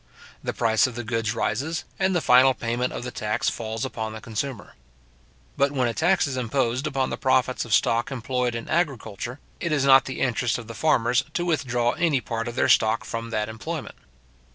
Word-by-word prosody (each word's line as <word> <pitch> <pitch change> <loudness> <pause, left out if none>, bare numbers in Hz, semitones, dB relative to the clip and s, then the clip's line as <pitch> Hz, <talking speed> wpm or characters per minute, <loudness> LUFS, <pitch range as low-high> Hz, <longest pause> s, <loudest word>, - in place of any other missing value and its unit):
The - - -1
price 110 +2 +2
of 125 - -8
the 120 - -4
goods 115 -1 -1
rises, 145 +10 -1 0.2
and 190 -1 +2
the 175 - +2
final 130 +1 +6
payment 120 +2 -1
of - - -5
the 125 - -5
tax 105 -2 -1
falls 110 +1 -4
upon 110 -4 -4
the 110 - -7
consumer. 115 +2 -5 0.8
But 140 +1 +2
when 130 -3 +1
a 115 - -1
tax 175 +7 +2
is 135 -3 -3
imposed 125 +2 0
upon 135 -3 -1
the - - -4
profits 130 -1 +1
of 115 - -3
stock 115 +1 +1
employed 125 -1 -2
in 115 - -5
agriculture, 130 - -2 0.2
it 170 - -2
is 145 -3 +2
not 135 -1 +7
the 130 - -5
interest 125 -2 +1
of 120 - -8
the 115 - -8
farmers 125 -2 +2
to 175 - 0
withdraw 125 -7 +1
any 160 -3 +1
part 115 0 -4
of 120 - -5
their - - +2
stock 110 +1 +3
from 115 0 -5
that 105 -2 -1
employment. 145 +8 -6
125 Hz, 200 wpm, -25 LUFS, 115-135 Hz, 0.8 s, not